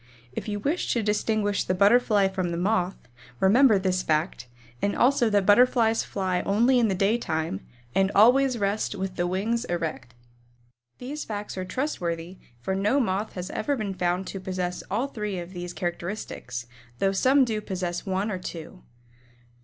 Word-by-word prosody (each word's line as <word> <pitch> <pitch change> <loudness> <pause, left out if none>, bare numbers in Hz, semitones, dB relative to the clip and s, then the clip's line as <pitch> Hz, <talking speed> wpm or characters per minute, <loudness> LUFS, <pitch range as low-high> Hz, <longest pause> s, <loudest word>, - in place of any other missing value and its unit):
If - - -5
you 205 -1 -2
wish 295 - -1
to 235 - 0
distinguish 210 -1 0
the 185 - -1
Butterfly 205 0 +4
from 185 -2 -2
the 170 - -3
Moth, 185 0 0 0.4
remember 220 +3 +5
this 185 -1 0
fact, 155 -6 -1 0.3
and 200 - 0
also 250 -2 +3
that 205 -2 +2
Butterflies 225 +1 +4
fly 185 -2 -1
only 235 +6 +3
in 235 - +3
the 195 - 0
daytime 180 - -1 0.3
and 195 +4 +2
always 250 +4 +5
rest 205 0 -1
with 190 -1 -4
the 175 - 0
wings 215 +6 -1
erect. 160 -8 -4 0.8
These 285 +5 -5
facts 210 -1 -5
are 185 -1 -4
trustworthy, 180 - -3 0.2
for 190 - -2
no 205 +8 +2
Moth 205 -3 -1
has 180 0 -5
ever 285 +6 -1
been 210 -6 -3
found 180 +1 -1
to 195 - -6
possess 185 -1 -3
all 225 +7 0
three 210 -7 -4
of 175 +1 -7
these 175 -1 -5
characteristics, 175 - -5 0.3
though 195 +7 +2
some 260 +7 +4
do 220 -3 -2
possess 180 -3 -3
one 195 +2 -1
or 185 - -3
two. 175 +1 -8
195 Hz, 165 wpm, -26 LUFS, 180-220 Hz, 0.8 s, remember